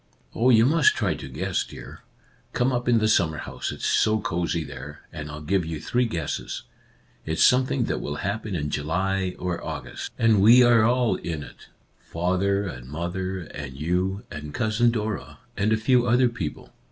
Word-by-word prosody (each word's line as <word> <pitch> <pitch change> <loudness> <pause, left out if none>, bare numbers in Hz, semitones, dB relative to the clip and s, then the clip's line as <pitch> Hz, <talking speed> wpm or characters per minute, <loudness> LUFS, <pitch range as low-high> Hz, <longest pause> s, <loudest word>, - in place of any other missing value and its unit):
"Oh, 120 +3 +2
you 115 -2 +6
must 150 +2 +4
try 100 -8 0
to 70 -3 -8
guess, 65 - -1
dear! - - -11 0.5
Come 125 +2 +1
up 125 -1 -1
in 120 - +5
the 110 -1 +2
summer 80 -7 +2
house; 65 0 -5
it's - - -6
so 110 0 +3
cosy 85 -3 -1
there, 75 +1 -9
and 75 -1 -6
I'll 75 +1 -8
give 95 +3 +1
you 80 -1 -5
three 125 +9 0
guesses. 80 -9 -4 0.6
It's 80 +1 +1
some 130 +1 +5
thing 130 -2 0
that - - -2
will 75 - -4
happen 100 +4 -3
in 75 -3 -2
July 95 +5 -1
or 90 -1 -3
August, - - -6
and 110 -3 +4
we 120 +5 +8
are 120 -2 +5
all 125 0 +2
in 80 -4 -4
it, - - -14 0.3
father 95 +4 0
and 65 -8 -7
mother 90 +4 -3
and 70 -5 -8
you 90 +5 -1
and 75 -1 -7
Cousin 110 0 +2
Dora, 110 -3 -3 0.2
and 105 +2 +1
a 110 - +3
few 120 +2 +3
other 120 +1 +4
people." 95 -11 -6
95 Hz, 185 wpm, -25 LUFS, 80-115 Hz, 0.6 s, we